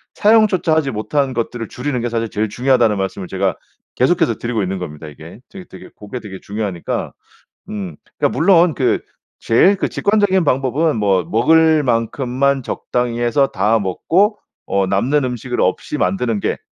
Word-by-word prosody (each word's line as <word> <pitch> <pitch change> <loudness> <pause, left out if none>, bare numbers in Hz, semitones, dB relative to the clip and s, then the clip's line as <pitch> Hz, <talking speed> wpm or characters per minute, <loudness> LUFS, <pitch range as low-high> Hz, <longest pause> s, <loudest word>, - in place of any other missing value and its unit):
사용조차 210 -6 +3
하지 155 -3 +1
못한 130 +5 -1
것들을 115 -1 -3
줄이는 125 -1 -3
게 120 - -2
사실 115 -1 -2
제일 105 +1 -2
중요하다는 125 -3 +2
말씀을 95 -1 -4
제가 95 0 -1 0.4
계속해서 - - +2
드리고 120 -2 -2
있는 95 0 -3
겁니다 75 -3 -7
이게. 80 +6 -12
되게 190 -2 -11
되게 - - -12
고게 105 +4 -8
되게 95 -3 -9
중요하니까. 100 -4 -4 0.6
음 95 -7 -6 0.2
그러니까 - - 0
물론 175 -1 +4
그 130 - +1 0.4
제일 180 - +4
그 195 - -1
직관적인 200 -3 +1
방법은 140 +3 +1
뭐 100 -4 +1
먹을 160 - +3
만큼만 130 +3 0
적당히 120 0 -2
해서 130 +4 +2
다 110 +2 +1
먹고 180 - +1 0.3
어 100 -1 +1
남는 125 +10 +1
음식을 125 0 -3
없이 - - -1
만드는 100 +4 0
게 - - -2
120 Hz, 360 characters per minute, -18 LUFS, 105-150 Hz, 0.6 s, 물론